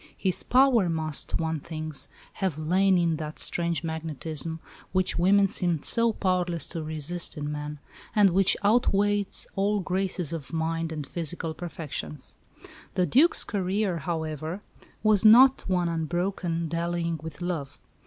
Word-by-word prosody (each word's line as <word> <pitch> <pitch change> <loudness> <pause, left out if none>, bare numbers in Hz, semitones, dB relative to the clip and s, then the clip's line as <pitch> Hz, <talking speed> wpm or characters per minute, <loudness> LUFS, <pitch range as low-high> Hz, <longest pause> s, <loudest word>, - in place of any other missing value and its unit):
His 185 -2 +1
power 250 -7 +4
must, 155 -2 0
one 160 -1 -1
thinks, 155 -1 -4 0.3
have 185 -6 0
lain 185 +4 +3
in 170 -2 +1
that 155 0 -6
strange 170 -1 -1
magnetism 160 -1 -4 0.3
which 185 -2 +1
women 195 +3 +5
seem 175 -6 -1
so 230 0 +3
powerless 180 -5 0
to 165 - -4
resist 155 +3 -3
in 150 0 -3
men, 150 0 -5 0.4
and 205 -3 +5
which 190 +2 +4
outweighs 205 -2 +2
all 205 +2 +1
graces 185 -3 -2
of 160 -2 -6
mind 165 0 -1
and 150 -3 -4
physical 165 0 -4
perfections. 155 - -6 0.6
The 180 - +2
Duc's 280 - +5
career, 195 -2 -1
however, 160 +3 -4 0.4
was 215 -3 +4
not 255 +5 +7
one 180 -2 +1
unbroken 170 +1 -2
dallying 170 0 -2
with 160 0 -8
love. 170 -6 -4
170 Hz, 135 wpm, -27 LUFS, 160-190 Hz, 0.6 s, not